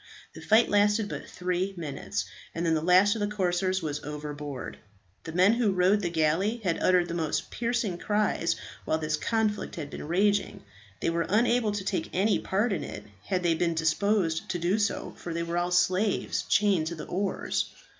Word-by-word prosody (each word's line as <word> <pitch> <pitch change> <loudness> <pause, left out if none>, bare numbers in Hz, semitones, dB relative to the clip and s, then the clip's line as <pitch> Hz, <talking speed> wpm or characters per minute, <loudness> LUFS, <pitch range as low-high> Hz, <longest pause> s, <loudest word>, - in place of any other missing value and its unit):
The - - -10
fight 220 +2 +4
lasted 205 +1 +3
but - - -6
three 180 +2 -2
minutes, 150 -5 -4 0.3
and 170 +1 -2
then 165 - +2
the 155 - +1
last 185 +4 +5
of - - -4
the 205 - +1
corsairs 185 -2 0
was 150 -2 -3
overboard. 145 -2 -6 0.5
The 165 - -5
men 185 +5 +4
who 235 -3 +2
rowed 185 +3 +3
the 175 - -1
galley 170 +8 +1
had 170 -4 0
uttered 180 -1 +3
the 170 - -4
most 160 -3 -2
piercing 235 -6 -1
cries 205 -5 +1 0.3
while 160 - 0
this 155 -1 -1
conflict 215 +5 -1
had 145 -4 -6
been - - -7
raging. 200 - +1 0.4
They - - +1
were 170 0 -1
unable 230 +1 +3
to 205 -2 -3
take 185 -5 -2
any 200 +3 +2
part 205 +3 0
in 165 - -2
it, - - -7 0.2
had 185 -1 -1
they 170 -1 +3
been 170 0 0
disposed 165 +1 +1
to 175 - -1
do 175 +5 +1
so, 210 - -1
for 170 -1 -6
they 170 - -1
were 170 +1 -1
all 175 0 -1
slaves 185 +3 +1
chained 195 -6 +3
to 170 - -4
the 155 - -7
oars. 195 +1 -2
180 Hz, 195 wpm, -28 LUFS, 165-205 Hz, 0.5 s, last